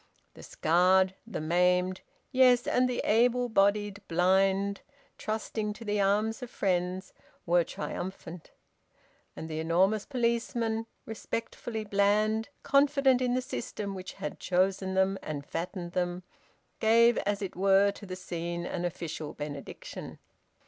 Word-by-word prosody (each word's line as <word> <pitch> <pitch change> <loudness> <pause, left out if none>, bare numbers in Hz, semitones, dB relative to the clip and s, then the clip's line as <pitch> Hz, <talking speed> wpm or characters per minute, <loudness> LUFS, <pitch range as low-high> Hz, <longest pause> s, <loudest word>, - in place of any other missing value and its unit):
The - - -13
scared, 185 +3 +3
the 230 - -4
maimed, 180 +3 +2 0.3
yes, 255 -2 +5
and 250 0 +2
the 245 - -1
able 245 +2 +3
bodied 205 -1 +2
blind 190 +3 +2 0.4
trusting 215 -1 -3
to 230 +2 -11
the 205 -1 0
arms 210 +4 +1
of 250 - -6
friends, 185 -2 -1 0.3
were 175 0 +4
triumphant. 175 0 -6 0.9
And 160 - -6
the 155 -1 -4
enormous 185 +6 +2
policemen, 235 -2 -1 0.2
respectfully 225 0 -5
bland, 210 +2 +1
confident 275 -2 +3
in 250 -1 +1
the 255 - 0
system 205 -5 -5
which 185 -1 -7
had 150 - -6
chosen 190 +1 0
them 190 +1 +2
and 145 -2 -5
fattened 175 +2 -5
them, 180 0 -2 0.6
gave 230 +2 +5
as 205 0 -1
it 190 - -5
were 195 +2 +4
to 200 0 -11
the 185 - -5
scene 170 -1 -4
an 175 0 -3
official 165 -3 -5
benediction. 145 -1 -7
195 Hz, 130 wpm, -29 LUFS, 180-220 Hz, 0.9 s, yes